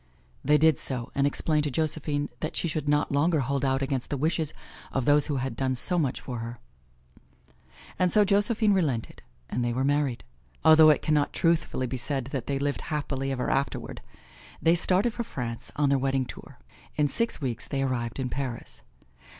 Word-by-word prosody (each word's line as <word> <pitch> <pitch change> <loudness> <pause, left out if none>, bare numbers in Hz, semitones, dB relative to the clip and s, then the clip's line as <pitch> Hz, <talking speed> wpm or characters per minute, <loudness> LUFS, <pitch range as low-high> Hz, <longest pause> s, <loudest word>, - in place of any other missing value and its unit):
They 150 +2 +4
did 160 -2 +4
so 125 -3 -2
and 140 0 +2
explained 150 +1 +1
to - - 0
Josephine 150 0 -1
that 155 - -4
she - - 0
should 150 -2 -2
not 145 0 +2
longer 150 +2 +2
hold 135 +1 -1
out 135 0 +1
against 135 -2 -2
the 145 - -2
wishes 155 +1 0 0.4
of 135 -3 -1
those 145 0 +4
who 145 - -1
had 130 -2 -2
done 130 +1 0
so 175 +8 +2
much 140 -6 -1
for 125 -3 -6
her. 115 +1 -6 1.4
And 180 -1 +3
so 210 -1 +5
Josephine 205 +2 +3
relented 145 - -1 0.3
and 120 - -2
they 120 0 0
were 130 +2 0
married, 140 -3 0 0.4
although 160 0 +8
it 150 - +3
can 155 - +1
not 145 -1 +1
truthfully 165 -6 +1
be 130 +1 -4
said 135 0 -3
that 135 -4 -4
they 140 - 0
lived 140 +1 -1
happily 135 -3 -2
ever 125 -2 -1
afterward. 135 0 -2 0.6
They 165 - +4
started 190 +6 +1
for 235 - -3
France, 115 - -6
on 145 -1 +2
their 140 -1 +3
wedding 135 0 0
tour. - - -11 0.4
In 150 -1 +2
six 230 +11 -1
weeks 125 -6 -4
they 135 -1 -1
arrived 120 -2 -2
in 130 -1 -1
Paris. 130 -3 -5
140 Hz, 190 wpm, -27 LUFS, 130-155 Hz, 1.4 s, although